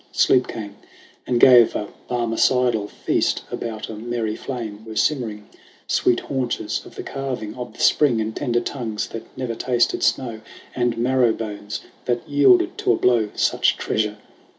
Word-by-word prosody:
Sleep 130 -1 +4
came 105 -3 -7 0.5
and 125 -1 +1
gave 120 -3 +7
a 105 - -3 0.2
Barmecidal 120 -2 +1
feast. - - 0
About 110 -2 -4
a - - -7
merry 110 0 -3
flame 110 -6 -6
were 110 -1 -9
simmering 110 -6 -1 0.4
Sweet 120 - +2
haunches 130 -3 -2
of - - -15
the - - -6
calving 130 -6 -4
of 125 -3 -7
the - - -17
Spring, 130 -7 +4
And 110 0 -3
tender 120 -1 0
tongues 115 -5 -4
that 115 0 -7
never 125 -3 -3
tasted 120 +1 +1
snow, 115 -4 0 0.3
And 120 -2 0
marrow 125 -1 +3
bones 105 -2 -5 0.2
that 120 -1 -1
yielded 140 -4 +4
to - - +2
a - - +2
blow 115 -4 +2
Such - - +2
treasure 105 -1 -1
120 Hz, 155 wpm, -22 LUFS, 110-125 Hz, 0.5 s, gave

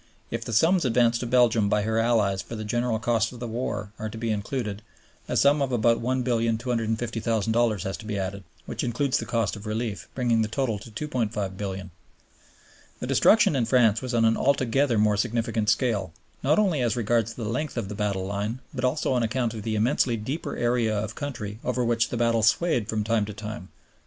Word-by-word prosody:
If 115 0 -3
the 115 - -6
sums 165 - +4
advanced 120 -2 +3
to 125 - -3
Belgium 115 -4 +3
by 105 -1 +2
her 110 +1 0
allies 110 -5 +2
for 115 - -8
the 110 - -5
general 120 +1 0
costs 115 -1 +1
of 125 - -10
the 120 - -4
war 105 -3 -3
are 110 - -3
to 110 - -8
be 115 0 -1
included, 105 0 -3 0.5
a - - 0
sum 145 +1 +4
of 135 -2 0
about 115 -1 +2
$1,250,000,000 115 -3 0
has 95 - -3
to 110 - -11
be 105 -1 -3
added 95 0 -4 0.2
(which - - -4
includes 125 +3 0
the 115 - -5
cost 115 -2 0
of 105 +1 -9
relief), 110 -1 -3
bringing 120 -3 +2
the 110 - +1
total 110 -1 -1
to 110 - -11 0.2
$2,500,000,000. 100 -6 -3 1.1
The - - -4
destruction 215 -8 +4
in 125 -4 +1
France 115 -4 +4
was 130 -2 -3
on 115 -1 +4
an 115 0 +3
altogether 135 -2 +2
more 105 -1 +3
significant 110 0 0
scale, 105 -6 +1 0.3
not 150 +4 +3
only 185 -10 +2
as 120 -2 +1
regards 115 -1 0
the 115 - -5
length 130 +6 -3
of 115 -4 -2
the 105 - -6
battle 100 -2 -1
line, 100 +4 -2 0.2
but 130 -2 -4
also 130 +2 +1
on 125 - +2
account 120 0 0
of 110 - -6
the 110 +1 -2
immensely 120 +2 +2
deeper 130 +10 -4
area 120 -3 +1
of 105 0 -3
country 110 -8 -5
over 125 0 0
which 115 0 +1
the 120 - -3
battle 115 -1 +2
swayed 115 +2 +2
from 110 -1 0
time 110 -1 +1
to 105 - -7
time. 105 -2 -7
115 Hz, 200 wpm, -26 LUFS, 105-125 Hz, 1.1 s, sums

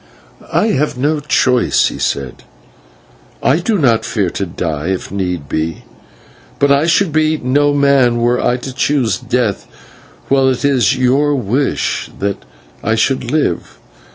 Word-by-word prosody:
"I 220 - +2
have 145 -6 0
no 150 +4 0
choice," 130 -4 +2
he - - -8
said. 70 -3 -3 1.0
"I 140 +5 +3
do 210 +4 0
not 115 - +2
fear 110 -6 -1
to 100 - -3
die 80 -2 -4
if 95 -1 -3
need 90 -6 -3
be, 80 +2 -3 0.7
but 140 0 +2
I 140 +3 +3
should 170 +1 +2
be 155 0 +2
no 145 +2 +1
man 140 -4 +3
were 120 +1 +1
I 125 - +1
to 130 +1 -7
choose 130 -7 0
death - - -1 0.6
while 135 -1 +3
it 130 +2 -1
is 130 -5 +2
your 135 +3 +2
wish 130 +3 -1
that 100 0 -3 0.4
I 110 +2 +1
should 125 +2 0
live. 145 - -1
130 Hz, 150 wpm, -15 LUFS, 100-145 Hz, 1.0 s, I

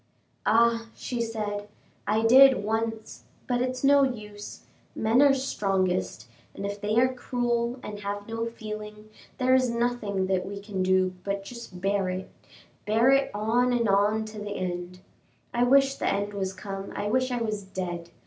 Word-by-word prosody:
"Ah!" 230 +1 +3
she 245 -2 -4
said, 210 -3 -3 0.4
"I 215 +2 +2
did 260 0 +7
once, 225 +1 -3 0.2
but 245 -1 0
it's 255 +1 -2
no 280 +1 +6
use; 210 -6 -4 0.3
men 225 +4 +3
are 285 -1 +7
strongest, 185 - -1 0.3
and 200 - -5
if 200 0 -5
they 210 +1 0
are 255 +2 +4
cruel 240 -1 -1
and 210 -1 -6
have 205 0 -5
no 225 0 -3
feeling, 215 -1 -8 0.3
there 255 0 +3
is 260 -1 +4
nothing 235 -5 -1
that 185 -1 0
we 200 +1 -6
can 200 -2 -4
do 185 0 +2
but 200 0 -3
just 215 -5 -9
bear 195 -1 +1
it 185 +1 -5 0.6
bear 225 +5 +4
it 275 0 +3
on 235 +4 +2
and 240 -2 +1
on 205 +2 +2
to 215 0 -8
the 205 0 -5
end. 180 0 -4 0.5
I 240 0 +3
wish 270 +1 +5
the - - -3
end 205 +1 -1
was 190 -2 -2
come, 195 0 -7
I 205 - -3
wish 255 +5 +1
I 250 - -1
was 215 -2 -2
dead. 180 -3 -5
215 Hz, 170 wpm, -27 LUFS, 200-240 Hz, 0.6 s, did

